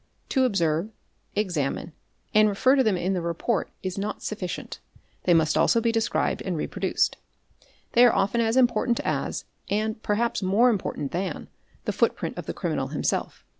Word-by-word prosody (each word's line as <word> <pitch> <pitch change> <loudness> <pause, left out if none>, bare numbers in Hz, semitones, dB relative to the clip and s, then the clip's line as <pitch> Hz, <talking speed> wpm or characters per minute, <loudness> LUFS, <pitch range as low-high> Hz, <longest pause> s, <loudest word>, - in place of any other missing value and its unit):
'To 265 -2 +3
observe, 170 -4 +1 0.5
examine, 175 -5 -1 0.4
and 215 0 +6
refer 255 +7 +3
to 270 - +4
them 215 -5 +2
in 185 +2 0
the 180 - -1
report 170 +6 -1
is 185 0 -3
not 205 +2 -4
sufficient, 195 -4 -5 0.5
they 175 - +5
must 160 -1 +3
also 230 - +4
be 230 0 +1
described 225 +1 0
and - - -2
reproduced. - - 0 0.7
They 240 - +6
are 240 - +6
often 200 +4 +2
as 225 +2 +1
important 240 -1 +3
as - - -2 0.2
and 215 +1 -1
perhaps 225 +3 0
more 205 +6 +4
important 155 -9 -3
than, 180 -2 -3 0.4
the - - -1
footprint - - 0
of - - -7
the - - -2
criminal - - -2
himself. - - -2
210 Hz, 165 wpm, -26 LUFS, 180-230 Hz, 0.7 s, and